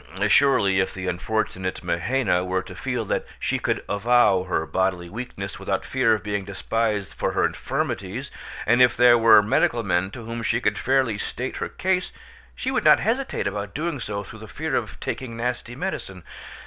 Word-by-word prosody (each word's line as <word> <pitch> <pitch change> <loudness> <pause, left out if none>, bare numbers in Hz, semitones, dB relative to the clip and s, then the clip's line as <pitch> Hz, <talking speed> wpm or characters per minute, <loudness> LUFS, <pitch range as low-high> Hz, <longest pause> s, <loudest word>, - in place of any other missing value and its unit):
Surely, 100 -8 +4
if 95 - 0
the 95 -1 -5
unfortunate 95 0 -2
Mahaina 90 0 0
were 95 0 -1
to - - -10
feel 125 -3 -3
that - - -1 0.2
she - - -1
could - - -1
avow 100 -3 +3
her 85 -3 -1
bodily 90 +2 -1
weakness 105 -4 -6
without - - -2
fear 125 -4 +2
of 105 - -6
being 105 -1 -2
despised 105 +1 -2
for - - -2
her - - +2
infirmities, - - -3 0.3
and 120 +3 +4
if 125 -4 +5
there 120 0 +7
were 115 -2 +7
medical 115 +2 +2
men 95 -1 +1
to 115 +2 -9
whom 115 +1 -5
she 110 - +1
could - - 0
fairly 130 -5 +1
state 125 +5 -4
her - - -3
case, 185 -1 -1 0.4
she 260 - -2
would 265 - 0
not - - +7
hesitate 250 +5 -1
about 100 0 -4
doing 160 -1 -2
so 100 -3 -4
through 110 +3 -11
the 110 - -10
fear 150 +7 -3
of - - -3
taking 115 -3 -5
nasty 120 0 -3
medicine. 120 - -5
110 Hz, 185 wpm, -24 LUFS, 95-125 Hz, 0.4 s, there